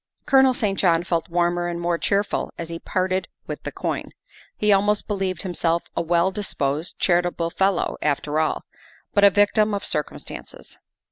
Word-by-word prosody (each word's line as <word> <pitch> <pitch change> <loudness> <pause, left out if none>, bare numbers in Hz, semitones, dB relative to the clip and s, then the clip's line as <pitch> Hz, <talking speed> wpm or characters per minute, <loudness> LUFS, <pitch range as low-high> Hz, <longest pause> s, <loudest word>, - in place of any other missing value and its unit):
Colonel 265 -2 +5
St. 200 -5 -1
John 170 -3 +3
felt 170 0 -1
warmer 175 0 +1
and 170 0 -3
more 170 0 0
cheerful 200 0 0
as 170 -1 -6
he 165 0 -5
parted 185 +1 -1 0.2
with - - -6
the - - -5
coin; - - -3 0.5
he 210 -1 +3
almost 205 +1 +2
believed 190 -4 -2
himself 170 -2 0
a - - +1
well 170 +2 +2
disposed, 160 -6 -2
charitable 175 -1 +1
fellow, 195 0 +1
after 150 +1 0
all, 160 - 0 0.5
but 205 - +3
a 200 - +9
victim 205 +2 +3
of 200 - -3
circumstances. 150 -1 -5
175 Hz, 160 wpm, -23 LUFS, 170-200 Hz, 0.5 s, a